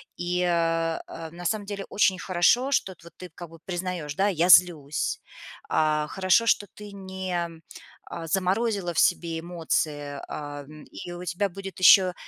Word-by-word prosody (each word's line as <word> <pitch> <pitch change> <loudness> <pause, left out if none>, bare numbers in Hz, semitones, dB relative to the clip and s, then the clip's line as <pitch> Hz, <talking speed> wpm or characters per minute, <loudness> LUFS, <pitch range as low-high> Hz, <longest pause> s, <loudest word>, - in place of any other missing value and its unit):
И, 180 0 -2
э, 165 -2 +1
э, 165 -1 -8
на 175 +1 -10
самом 205 +3 -1
деле 200 -1 -5
очень 190 -2 +2
хорошо, 190 +10 +2
что 190 -8 0
вот 170 - -13
ты 180 - -9
как 175 +2 -10
бы 165 0 -14
признаешь: 175 -5 -4
"Да, 195 +4 +2
я 175 -2 +1
злюсь". 165 -5 +4 0.5
А, 155 -1 +1
хорошо, 190 +6 +2
что 205 -2 +2
ты 210 -1 -10
не, 190 -3 -4 0.6
а, 165 -1 -7
заморозила 190 +1 0
в - - 0
себе 165 -1 +2
эмоции, 155 -4 -2
а, 145 -1 -7 0.3
и 175 - -8
у 175 +1 -7
тебя 180 +3 -1
будет 195 +1 -9
ещё 185 0 +7
175 Hz, 160 wpm, -26 LUFS, 165-190 Hz, 0.6 s, ещё